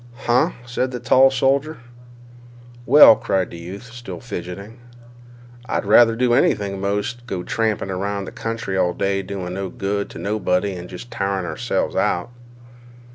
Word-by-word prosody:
"Huh!" 120 +1 +3
said 125 +1 -1
the 125 -1 -2
loud 135 +1 +7
soldier. 135 +4 +1 1.1
"Well," 140 -4 +9
cried 95 -3 -1
the 85 - -9
youth, 100 +9 -9
still 120 -1 -8
fidgeting, 100 +1 -7 0.9
"I'd - - -1
rather 115 +2 +6
do 120 0 +2
anything 100 -4 +1
'most 105 +4 -1
than 120 - -21
go 95 -6 -4
tramping 110 -2 -1
'round 100 +1 -3
the - - -8
country 115 -4 -4
all 90 -2 +1
day 100 +1 -1
doing 95 -2 -5
no 95 0 -4
good 100 +2 -3
to - - -10
nobody 100 -2 -1
and 90 -1 -8
jest 95 +6 -10
tiring 95 -1 -2
ourselves 120 +7 -2
out." 90 +7 0
100 Hz, 155 wpm, -21 LUFS, 95-120 Hz, 1.1 s, Well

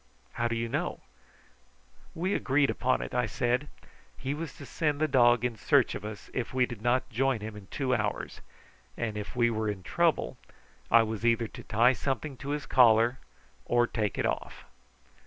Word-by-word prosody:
"How 120 - -1
do 115 - -2
you 115 0 -1
know?" - - -3 1.1
"We 185 +4 -1
agreed 140 +1 +2
upon 130 +1 0
it," - - -7
I 125 -2 +1
said. 125 +5 0 0.5
"He 135 +1 -3
was 155 0 -5
to 140 - -10
send 150 0 -1
the 155 - +2
dog 120 -3 +4
in 120 -2 -1
search - - +3
of - - -6
us 105 -1 -8
if 125 0 -3
we 125 -1 +4
did 120 -4 -9
not 120 +3 +1
join 130 -1 +1
him 110 0 -6
in 100 -2 -11
two 130 -2 -1
hours; 110 -4 -2 0.6
and 115 -3 -2
if 105 +2 -6
we 120 -1 +3
were 110 -1 -1
in 100 -3 -5
trouble - - +1 0.5
I 115 - +6
was 110 -1 -4
either 115 -1 +2
to - - -10
tie 115 +3 +4
something 135 +3 -3
to 140 - -7
his 145 0 -2
collar 120 +1 +5 0.5
or 120 0 +3
take 110 -4 -2
it - - 0
off." - - -3
120 Hz, 190 wpm, -29 LUFS, 110-130 Hz, 1.1 s, I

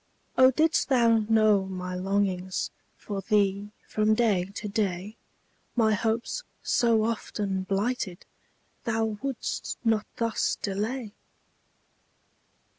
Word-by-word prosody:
Oh, 260 0 +7
didst 315 +5 +2
thou 235 -4 +5
know 215 -3 +4
my 180 -1 -5
longings 185 0 -1 0.3
For 200 -2 -5
thee, 200 0 +1 0.2
from 215 0 +2
day 210 -6 +2
to 210 - -4
day, 200 -1 -2 0.6
My 220 -3 +4
hopes, 225 - -1 0.2
so 230 -2 +3
often 210 -3 -2
blighted, 195 0 -2 0.6
Thou 225 -2 0
wouldst 275 -3 -3
not 220 -2 +1
thus 230 -1 0
delay! 215 +4 -3
215 Hz, 105 wpm, -27 LUFS, 195-230 Hz, 0.6 s, Oh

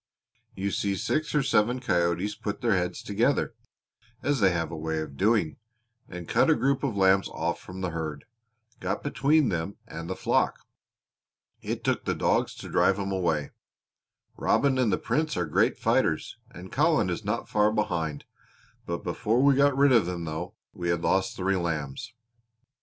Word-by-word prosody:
You 100 +1 -2
see 100 0 0
six 155 - -1
or 150 - +3
seven 125 -1 +2
coyotes 90 -2 0
put 105 0 -5
their 115 -4 +2
heads 90 -1 -2
together, 115 +6 +1 0.7
as 145 -2 +1
they 100 -3 +5
have 85 -2 -2
a - - -5
way 80 0 -2
of 75 -3 -6
doing, 100 -1 +1 0.5
and 90 -2 -8
cut - - +3
a 160 - +5
group 135 -1 +1
of 135 -7 -1
lambs 95 0 +4
off 85 +2 -2
from 95 +1 -9
the 90 -2 -2
herd 80 -3 -5 0.5
got - - -3
between 145 0 +2
them 85 +2 -3
and 85 +1 -7
the - - -2
flock. - - +1 1.0
It - - -4
took - - 0
the - - 0
dogs - - +1
to - - -9
drive 95 - +3
'em 100 -1 -3
away. 85 -6 0 0.9
Robin 135 -2 +2
and 120 -5 +2
the - - +2
Prince 155 - -1
are 90 - 0
great 75 - +2
fighters, - - +1
and 90 +1 -11
Colin 150 - +2
is 85 +5 -4
not 105 +3 -2
far 105 0 +2
behind. 85 -9 -2 0.6
Before 100 +8 0
we 140 0 +6
got 140 0 +3
rid 140 0 +5
of 115 -8 +4
them, 85 -2 -4
though, 80 0 -5 0.2
we 85 -1 -3
had 85 -1 0
lost 95 0 +1
three 95 +1 0
lambs. 85 - -3
95 Hz, 175 wpm, -27 LUFS, 85-120 Hz, 1.0 s, we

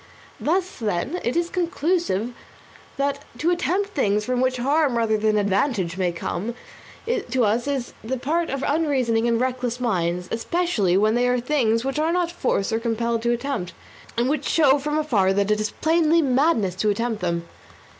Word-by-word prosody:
Thus, 365 +2 -1
then, 220 - -1
it 240 - -1
is 345 0 0
conclusive 335 - 0 0.7
that 280 0 -1
to 320 +7 +1
attempt 365 +3 0
things 210 - +1
from 250 0 0
which 255 0 +1
harm 275 0 +2
rather 225 -2 +2
than 215 0 +1
advantage 200 - 0
may 185 -2 0
come 180 +6 -4 0.5
to 260 - 0
us 230 +5 0
is 275 -4 -2
the 255 +4 -2
part 325 +7 -1
of 275 0 -3
unreasoning 260 -7 +1
and 230 -1 +2
reckless 250 -1 -1
minds, 180 -6 -1
more - - +1
especially 230 - +1
when 215 +2 +3
they 245 +1 +2
are 250 0 +2
things 240 -3 +1
which 270 +2 -1
we - - +2
are 325 - +1
not 350 -1 0
forced 240 - -1
or 225 - +1
compelled 230 0 -1
to 235 +1 +1
attempt, 240 -6 -3 0.4
and 240 +1 +2
which 290 0 -1
show 290 -3 +4
from 300 +2 -1
afar 210 -11 +2
that 200 +1 +1
it 210 - +2
is 215 0 -1
plainly 325 +3 +2
madness 260 - +2
to 210 +2 +1
attempt 225 +1 -1
them. 170 -1 -2
245 Hz, 185 wpm, -23 LUFS, 215-300 Hz, 0.7 s, show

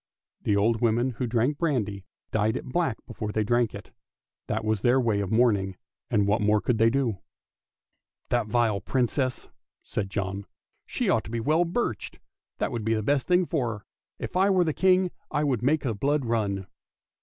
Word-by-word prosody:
The 105 - +1
old 110 +3 +2
women 120 +2 +2
who 125 +1 -3
drank 120 +5 +1
brandy 105 - -1 0.3
dyed 110 0 +1
it - - -7
black 130 -3 0
before 110 -3 -5
they 110 0 0
drank 120 +1 +1
it; - - -10 0.6
that - - -2
was 110 -2 0
their 125 +2 +4
way 115 -5 +1
of 100 -2 -2
mourning, 105 -5 +2 0.3
and 105 -1 +2
what 105 +2 +2
more 105 +1 +3
could 115 +1 0
they 115 +1 +5
do! 120 -6 0 0.5
" - - -52
That 120 -3 +1
vile 110 -3 +1
Princess! 130 +3 -1 0.2
" - - -54
said 100 -2 -3
John, 95 0 -3 0.2
" - - -51
she - - -2
ought - - +2
to - - -8
be 115 +1 -2
well 155 +9 +2
birched, 170 - -2 0.4
that - - -1
would 115 -2 -3
be 110 +1 +1
the 110 - -1
best 140 +4 +1
thing 180 0 +4
for 120 -10 -1
her. 100 - -18 0.3
If - - -6
I 190 +2 +4
were 185 -2 +4
the 160 -3 0
King 185 0 +3 0.2
I 150 - 0
would 130 -7 0
make 145 +5 +2
the 120 -5 0
blood 140 +5 0
run! 105 -4 -1
115 Hz, 200 wpm, -27 LUFS, 105-135 Hz, 0.6 s, they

